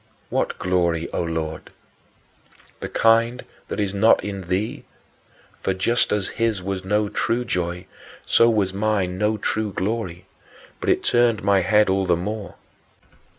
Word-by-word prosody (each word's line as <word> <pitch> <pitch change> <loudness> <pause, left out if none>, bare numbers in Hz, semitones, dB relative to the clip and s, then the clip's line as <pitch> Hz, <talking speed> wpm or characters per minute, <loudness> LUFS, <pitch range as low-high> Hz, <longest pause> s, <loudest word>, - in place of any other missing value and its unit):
What - - -1
glory, 85 -2 0
O - - 0
Lord? 80 -2 -4 1.1
The - - -5
kind 115 +2 +2 0.2
that - - -4
is 100 -2 -1
not 110 +3 +4
in 100 -3 -5
thee, 95 +5 -2 0.7
for, 95 - -2
just 115 +6 +1
as 105 -2 0
his 115 -3 +2
was 95 0 -4
no 105 +2 +1
true 120 +4 -1
joy, 90 -3 -2 0.4
so 115 - +5
was 100 -4 +1
mine 100 -3 0
no 105 +1 +1
true 110 +1 -1
glory; 95 -2 -3 0.5
but - - -2
it - - +2
turned 120 -4 +2
my 100 -1 +4
head 105 +3 +4
all 95 0 +1
the 90 - +4
more. 105 +3 -5
100 Hz, 150 wpm, -23 LUFS, 90-110 Hz, 1.1 s, so